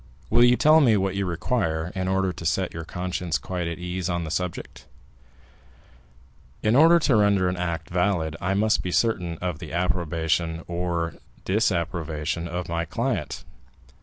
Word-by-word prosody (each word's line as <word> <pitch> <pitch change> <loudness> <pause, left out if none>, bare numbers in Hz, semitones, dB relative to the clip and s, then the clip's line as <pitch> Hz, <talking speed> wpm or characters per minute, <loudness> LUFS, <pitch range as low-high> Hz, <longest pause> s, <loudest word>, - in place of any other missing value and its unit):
Will 120 +2 +6
you 120 0 +6
tell 155 +1 +6
me 115 -7 +5
what 95 -1 0
you 100 -1 -1
require, 85 -3 -1
in 95 -1 -2
order 95 -1 +1
to - - -9
set 90 +3 0
your 80 - -5
conscience 90 -1 -2
quite 90 -2 -4
at 85 -1 -4
ease 90 0 -4
on 85 -1 -1
the 80 - -5
subject?" 75 -8 -4 1.8
"In 110 +2 +3
order 165 +4 +7
to 150 -6 +2
render 100 -3 +3
an 90 - -1
act 85 -2 -3
valid, 90 -4 0
I 95 +2 0
must 110 +2 +2
be 90 - -4
certain 90 -5 0
of 90 -3 -2
the 80 - -8
approbation 80 -1 -1
or 85 -1 -2 0.3
disapprobation 85 -5 -1
of 90 +1 -4
my 85 0 -1
client. 85 - -3
90 Hz, 165 wpm, -25 LUFS, 85-95 Hz, 1.8 s, order